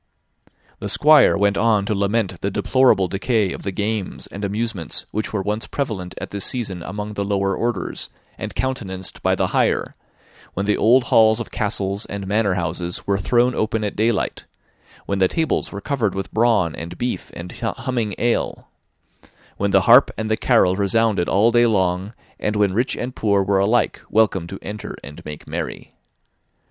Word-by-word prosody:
'" - - -35
The 105 - -3
Squire 150 +1 +6
went 100 0 +2
on 110 -3 +3
to 105 - 0
lament 100 -2 -1
the 100 - 0
deplorable 100 -1 +3
decay 100 0 0
of - - -8
the 100 - -3
games 105 0 -3
and 100 - -8
amusements 100 -4 -2
which 110 +1 -3
were 105 -3 -2
once 105 +3 -2
prevalent 105 -10 -4
at - - -7
this 100 -1 -3
season 105 -8 -2
among 105 +4 -5
the 100 - -2
lower 100 -1 0
orders, 120 +1 -3 0.3
and - - -7
countenanced 100 -8 -4
by - - +2
the - - 0
higher: - - +1 0.6
when 100 - -1
the 105 - +2
old 120 +4 +4
halls 110 -1 +4
of 115 - -6
castles 100 -2 -2
and 100 -1 -5
manor 100 -1 +1
houses 85 0 -3
were 100 -1 +1
thrown 120 +6 +2
open 110 -1 -1
at 105 - -3
daylight; 110 -1 0 0.6
when 100 -1 -2
the 95 - +5
tables 160 - -1
were 100 - -6
covered 115 -8 -1
with 95 -1 -5
brawn, 110 -8 +2
and 85 +2 -7
beef, 125 0 -3
and 85 +1 -7
humming 115 -2 -2
ale; 120 0 -1 0.9
when 100 - 0
the 95 -1 +4
harp 120 +9 +7
and 110 0 -3
the - - +4
carol 110 -7 +3
resounded 100 -1 +1
all 110 +4 +4
day 120 0 +4
long, 95 0 0 0.2
and 105 - -1
when 100 -2 +2
rich 120 +6 +1
and 125 +1 -4
poor 100 -2 +2
were 95 0 +2
alike 110 +5 +1
welcome 100 -6 +2
to 95 - -7
enter 105 0 -6
and 70 +1 -10
make 75 -1 -8
merry. - - -5
105 Hz, 180 wpm, -21 LUFS, 95-115 Hz, 0.9 s, harp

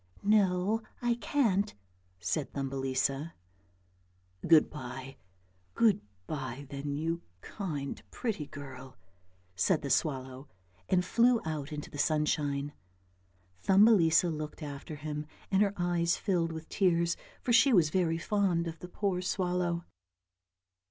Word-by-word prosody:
" - - -31
No, 200 0 +3 0.2
I 240 -1 +1
can't," 225 -5 +1 0.4
said 95 - -2
Thumbelisa. 135 +2 -1 0.6
" 90 0 -15
Good 160 -2 +7
bye, 130 -1 -8 0.6
good 215 -3 +4 0.2
bye, 135 0 -5
then, 140 0 -3
you 165 +3 -2 0.2
kind 150 -9 -5
pretty 210 - -3
girl," 135 -2 -10 0.6
said 85 - +2
the 140 - -2
swallow, 130 -2 -1 0.4
and 180 -1 +3
flew 240 +2 +4
out 155 -2 -3
into 150 -1 -6
the 145 - -7
sunshine. 145 -2 0 0.9
Thumbelisa 190 -5 +5
looked 155 +1 -5
after 145 +1 -6
him 150 0 -5 0.2
and 195 0 +4
her 200 -1 +3
eyes 175 -1 +1
filled 175 -4 0
with 160 0 -7
tears, 170 -3 +2 0.3
for 240 - +1
she 265 +4 +6
was 170 -9 +4
very 165 -3 +1
fond 180 -2 +1
of 165 -1 -6
the 180 - -9
poor 185 -1 -1
swallow. 180 -2 -1
160 Hz, 125 wpm, -31 LUFS, 140-185 Hz, 0.9 s, Good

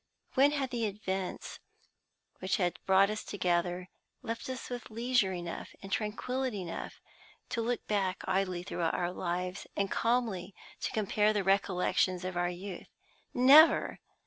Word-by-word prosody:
When 280 +2 +5
had 270 -3 -1
the 235 -3 0
events 195 -2 -4 0.8
which 185 +1 0
had 175 -3 0
brought 195 +1 +5
us 215 - -4
together 180 -1 -1 0.3
left 230 +3 -4
us 260 -1 -5
with 245 -1 -6
leisure 230 -2 +1
enough 175 -2 -6
and 195 - -8
tranquillity 225 +1 -2
enough 170 - -6 0.5
to 230 - -1
look 240 +1 -2
back 195 -3 -1
idly 185 -2 0
through 180 - -5
our 175 +1 0
lives, 180 +1 -3
and 200 -1 0
calmly 220 -6 0 0.2
to - - -2
compare 215 0 +2
the 205 -2 0
recollections 185 -1 +1
of 185 0 -4
our 175 0 +1
youth? 180 +1 -7 0.4
Never! 280 +6 +6
195 Hz, 145 wpm, -31 LUFS, 180-230 Hz, 0.8 s, Never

